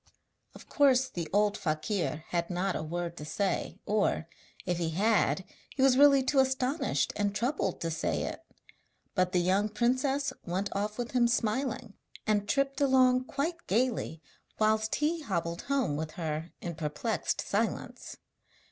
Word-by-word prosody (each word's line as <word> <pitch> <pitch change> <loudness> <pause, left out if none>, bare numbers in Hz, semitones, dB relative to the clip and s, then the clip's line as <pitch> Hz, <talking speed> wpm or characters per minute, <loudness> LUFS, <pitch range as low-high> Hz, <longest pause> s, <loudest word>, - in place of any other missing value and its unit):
Of - - -13
course 265 -2 +4
the 170 -2 -4
old 205 +1 +3
fakir 155 -1 -1
had 170 -1 -1
not 185 +1 -1
a - - -2
word 170 +2 -4
to - - -6
say, 180 +5 -2
or, 205 -5 +1 0.4
if 175 -1 -1
he 165 -2 0
had, 195 +1 +2 0.3
he 265 - +1
was 270 -2 +6
really 280 0 +6
too 270 +1 +2
astonished 265 +3 +1
and 205 -1 -1
troubled 235 - -1
to 165 - -1
say 160 +1 -1
it; - - -5 0.7
but 185 -2 +1
the 185 - +1
young 190 +4 +2
princess 260 +5 +1
went 190 +3 -3
off 210 +1 -2
with 240 -1 -3
him 245 -2 +3
smiling, 235 -1 -1 0.3
and 205 -1 +1
tripped 275 0 +1
along 255 -2 +4
quite 320 +6 -3
gaily, 220 -8 0 0.3
whilst 215 0 +2
he 320 +3 0
hobbled 170 - -2
home 270 - +1
with 155 0 -4
her 160 0 -4
in 170 - -4
perplexed 155 -2 -2
silence. - - -2
210 Hz, 155 wpm, -30 LUFS, 175-260 Hz, 0.7 s, was